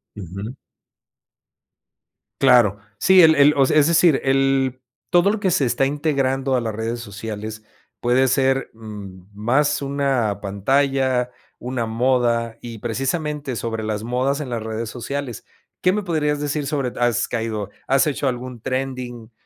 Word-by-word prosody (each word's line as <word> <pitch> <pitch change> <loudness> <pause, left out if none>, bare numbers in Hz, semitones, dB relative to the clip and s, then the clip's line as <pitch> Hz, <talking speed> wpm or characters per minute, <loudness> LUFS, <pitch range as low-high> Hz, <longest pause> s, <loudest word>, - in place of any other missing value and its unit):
Ujú. 100 +5 -7 1.9
Claro. 120 -7 +5 0.2
Sí, 190 0 +6
el 160 -1 +7
el 145 +1 +6
o 135 - +4
sea, 150 - +2
es 150 0 +5
decir 165 -3 +4
el 135 -1 +1 0.3
todo 175 +2 +4
lo 215 - -2
que 195 -3 +1
se 160 -6 +2
está 125 +2 +1
integrando 135 -2 0
a 125 - +1
las 110 -2 -3
redes 115 +2 -3
sociales 110 0 -7 0.4
puede 125 +2 +3
ser, 135 +1 +1
mm, 100 -5 -10
más 130 +9 +1
una 135 -7 0
pantalla, 130 +4 +1 0.3
una 125 -1 -3
moda, 115 0 +1
y 115 -2 -8
precisamente 135 +4 -2
sobre 115 -1 -3
las 110 -1 -3
modas 130 +5 0
en 135 - -5
las 115 -2 -3
redes 110 0 -4
sociales, 125 +1 -5 0.4
¿qué 185 - +3
me 210 +1 -1
podrías 150 -5 0
decir 145 0 -2
sobre 135 -3 -1
d - - -10
has 120 -1 +1
caído, 110 -4 -3 0.2
has 135 0 +4
hecho 145 -2 -1
algún 125 -1 -4
trending, 130 -3 -4
130 Hz, 150 wpm, -21 LUFS, 115-140 Hz, 1.9 s, el